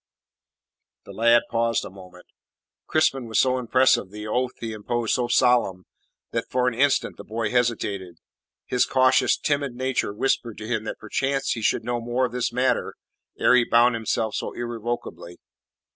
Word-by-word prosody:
The -, -, -10 dB
lad 115 Hz, +1 st, +4 dB
paused 115 Hz, 0 st, 0 dB
a -, -, -9 dB
moment. 90 Hz, -2 st, -14 dB, 0.6 s
Crispin 135 Hz, -5 st, +1 dB
was 110 Hz, -, +1 dB
so 130 Hz, -1 st, +2 dB
impressive, 125 Hz, -4 st, +2 dB
the 105 Hz, +2 st, -8 dB
oath 125 Hz, +4 st, -1 dB
he 115 Hz, -1 st, -5 dB
imposed 115 Hz, +2 st, -2 dB
so 125 Hz, -1 st, 0 dB
solemn, 120 Hz, -7 st, +2 dB, 0.5 s
that -, -, -3 dB
for 125 Hz, 0 st, +1 dB
an 125 Hz, -, +1 dB
instant 140 Hz, +4 st, +1 dB
the -, -, -9 dB
boy 110 Hz, -1 st, -3 dB
hesitated. 105 Hz, -8 st, -1 dB, 0.5 s
His 125 Hz, -, +1 dB
cautious, 130 Hz, 0 st, +3 dB
timid 140 Hz, -4 st, -1 dB
nature 130 Hz, -4 st, -1 dB
whispered 115 Hz, +1 st, -1 dB
to 110 Hz, -, -7 dB
him 110 Hz, -2 st, -2 dB
that -, -, -5 dB
perchance 135 Hz, +5 st, -2 dB
he 115 Hz, -, -2 dB
should 110 Hz, -, +1 dB
know 120 Hz, 0 st, -2 dB
more 120 Hz, +2 st, 0 dB
of 125 Hz, -, -4 dB
this 125 Hz, -1 st, -1 dB
matter 125 Hz, +2 st, 0 dB, 0.4 s
ere -, -, +4 dB
he 125 Hz, -1 st, +5 dB
bound 120 Hz, +1 st, +4 dB
himself 110 Hz, -1 st, -1 dB
so -, -, -4 dB
irrevocably. 120 Hz, -6 st, -5 dB
120 Hz, 165 wpm, -24 LUFS, 110-125 Hz, 0.6 s, he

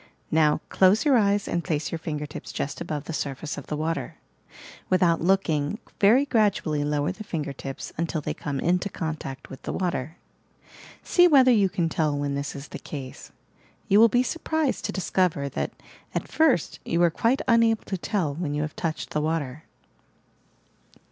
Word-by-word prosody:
Now, 155 Hz, -1 st, +3 dB
close 190 Hz, +6 st, +4 dB
your 285 Hz, -3 st, +5 dB
eyes 205 Hz, -3 st, +2 dB
and 170 Hz, 0 st, -1 dB
place 155 Hz, -4 st, -2 dB
your 165 Hz, -, -3 dB
finger 150 Hz, -2 st, -4 dB
tips 150 Hz, -, -8 dB
just 140 Hz, -, -4 dB
above 155 Hz, -4 st, -3 dB
the 165 Hz, -, -6 dB
surface 145 Hz, +1 st, -3 dB
of 145 Hz, -, -9 dB
the 150 Hz, -, -3 dB
water. 160 Hz, +2 st, -2 dB, 0.7 s
"Without 175 Hz, -3 st, +3 dB
looking, 170 Hz, -2 st, +1 dB, 0.2 s
very 235 Hz, +8 st, +5 dB
gradually 200 Hz, -, +1 dB
lower 145 Hz, 0 st, 0 dB
the 215 Hz, +3 st, -8 dB
finger 155 Hz, -8 st, -4 dB
tips 135 Hz, 0 st, -7 dB
until 165 Hz, -1 st, -1 dB
they 150 Hz, -, -3 dB
come 140 Hz, -2 st, -4 dB
into 180 Hz, +5 st, +1 dB
contact 155 Hz, -7 st, -5 dB
with 135 Hz, -, -9 dB
the -, -, -4 dB
water. 170 Hz, -4 st, -2 dB, 0.9 s
See 355 Hz, -1 st, +5 dB
whether 265 Hz, -6 st, +6 dB
you 205 Hz, -5 st, +4 dB
can 175 Hz, -2 st, 0 dB
tell 155 Hz, -3 st, 0 dB
when 145 Hz, 0 st, -1 dB
this 140 Hz, 0 st, -3 dB
is 140 Hz, +1 st, -8 dB
the -, -, -7 dB
case. 135 Hz, -4 st, -8 dB, 0.6 s
You 200 Hz, -, +5 dB
will 230 Hz, +1 st, +8 dB
be 245 Hz, +3 st, +3 dB
surprised 315 Hz, -1 st, -1 dB
to -, -, -1 dB
discover 180 Hz, -6 st, 0 dB
that, -, -, -2 dB, 0.5 s
at -, -, -2 dB
first, 290 Hz, -, +2 dB
you 170 Hz, -, -1 dB
are 170 Hz, -, +4 dB
quite 230 Hz, +10 st, +1 dB
unable 230 Hz, -2 st, +4 dB
to 195 Hz, -, -3 dB
tell 180 Hz, -5 st, -1 dB
when 150 Hz, -1 st, -3 dB
you 150 Hz, -, 0 dB
have 150 Hz, -, -5 dB
touched 160 Hz, -2 st, -3 dB
the 150 Hz, -, 0 dB
water 155 Hz, -2 st, -2 dB
165 Hz, 180 wpm, -25 LUFS, 150-200 Hz, 0.9 s, will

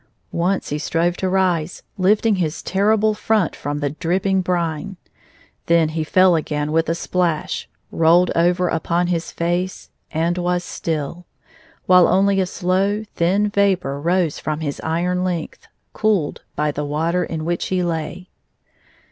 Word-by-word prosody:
Once 180 Hz, +3 st, -1 dB
he 150 Hz, -, -2 dB
strove 170 Hz, +3 st, 0 dB
to 185 Hz, -, -2 dB
rise, 180 Hz, -3 st, 0 dB
lifting 205 Hz, +2 st, +2 dB
his 165 Hz, -3 st, -2 dB
terrible 215 Hz, +3 st, +2 dB
front 210 Hz, -3 st, 0 dB
from 145 Hz, +1 st, -4 dB
the 145 Hz, -1 st, -1 dB
dripping 185 Hz, +4 st, 0 dB
brine. 175 Hz, +1 st, -2 dB, 0.7 s
Then 165 Hz, -2 st, +4 dB
he 160 Hz, 0 st, -2 dB
fell 185 Hz, +2 st, +4 dB
again 150 Hz, -1 st, -2 dB
with 165 Hz, 0 st, +1 dB
a 165 Hz, -, +1 dB
splash, 170 Hz, -2 st, -1 dB, 0.2 s
rolled 170 Hz, +2 st, +4 dB
over 175 Hz, +2 st, +2 dB
upon 170 Hz, +2 st, 0 dB
his 165 Hz, 0 st, -3 dB
face, 175 Hz, +2 st, -2 dB, 0.2 s
and 170 Hz, +3 st, 0 dB
was 180 Hz, 0 st, 0 dB
still, 165 Hz, 0 st, -4 dB, 0.6 s
while 180 Hz, -1 st, +6 dB
only 195 Hz, +1 st, +3 dB
a 185 Hz, -, 0 dB
slow, 195 Hz, +4 st, 0 dB
thin 195 Hz, +5 st, +1 dB
vapor 185 Hz, -9 st, +1 dB
rose 170 Hz, -1 st, +1 dB
from 155 Hz, +1 st, -3 dB
his 145 Hz, -3 st, -4 dB
iron 180 Hz, +3 st, 0 dB
length, 175 Hz, -4 st, -4 dB, 0.3 s
cooled 205 Hz, -9 st, 0 dB
by 150 Hz, 0 st, 0 dB
the 145 Hz, 0 st, -4 dB
water 160 Hz, +5 st, 0 dB
in 160 Hz, -1 st, -4 dB
which 170 Hz, +1 st, -1 dB
he 185 Hz, -1 st, 0 dB
lay. 170 Hz, +2 st, -3 dB
175 Hz, 145 wpm, -20 LUFS, 160-185 Hz, 0.7 s, while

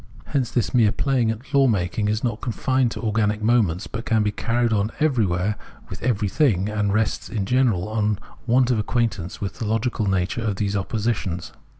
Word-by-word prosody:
Hence 130 Hz, -4 st, -1 dB
this 120 Hz, -, -1 dB
mere 115 Hz, -5 st, +4 dB
playing 130 Hz, -3 st, +1 dB
at 120 Hz, +6 st, -5 dB
law 140 Hz, -1 st, +5 dB
making 105 Hz, -1 st, 0 dB
is 105 Hz, +1 st, -1 dB
not 115 Hz, -3 st, -2 dB
confined 130 Hz, +1 st, +1 dB
to 115 Hz, -, -7 dB
organic 105 Hz, -1 st, +1 dB
moments, 105 Hz, -7 st, +2 dB
but 115 Hz, -, -6 dB
can 110 Hz, -3 st, +2 dB
be 105 Hz, -, +1 dB
carried 115 Hz, +2 st, 0 dB
on 105 Hz, +1 st, +1 dB
everywhere 105 Hz, -, +1 dB, 0.3 s
with 95 Hz, -, -7 dB
every 110 Hz, -4 st, +1 dB
thing 100 Hz, -, +2 dB
and 105 Hz, -1 st, 0 dB
rests 110 Hz, +1 st, 0 dB
in 105 Hz, -4 st, -2 dB
general 115 Hz, -5 st, +2 dB
on 105 Hz, -1 st, 0 dB, 0.3 s
want 125 Hz, +1 st, +3 dB
of 115 Hz, -, +2 dB
acquaintance 105 Hz, -5 st, -1 dB
with 100 Hz, -, -4 dB
the 115 Hz, -, -2 dB
logical 110 Hz, -1 st, 0 dB
nature 95 Hz, +4 st, 0 dB
of 110 Hz, -3 st, -1 dB
these 100 Hz, +1 st, -1 dB
oppositions. 100 Hz, -4 st, -2 dB
110 Hz, 190 wpm, -23 LUFS, 100-120 Hz, 0.3 s, law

